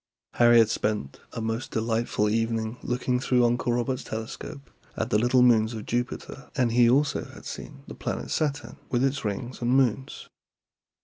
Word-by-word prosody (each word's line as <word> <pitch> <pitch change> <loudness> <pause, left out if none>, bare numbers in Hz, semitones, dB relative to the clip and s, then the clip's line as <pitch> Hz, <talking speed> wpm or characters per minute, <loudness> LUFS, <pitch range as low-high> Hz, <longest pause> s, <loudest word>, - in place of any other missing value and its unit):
Harry 120 0 +6
had 115 -2 +6
spent 105 -10 -2
a - - -4
most 115 +2 -3
delightful 115 -1 0
evening 115 +1 0
looking 125 0 -1
through 125 -1 +3
Uncle 120 +1 +1
Robert's 120 +2 -1
telescope 115 +6 -7 0.3
at - - -2
the 105 - +4
little 125 +2 +4
moons 115 -2 +4
of 110 - -6
Jupiter, 125 +2 -4
and 125 -4 +2
he 120 0 +5
also 140 +3 +2
had - - -13
seen 70 - -8
the - - -9
planet - - -4
Saturn, 145 -1 -2
with 125 0 +1
its 135 +1 0
rings 115 +5 -4
and 120 - 0
moons. 130 0 0
120 Hz, 170 wpm, -26 LUFS, 110-125 Hz, 0.3 s, Harry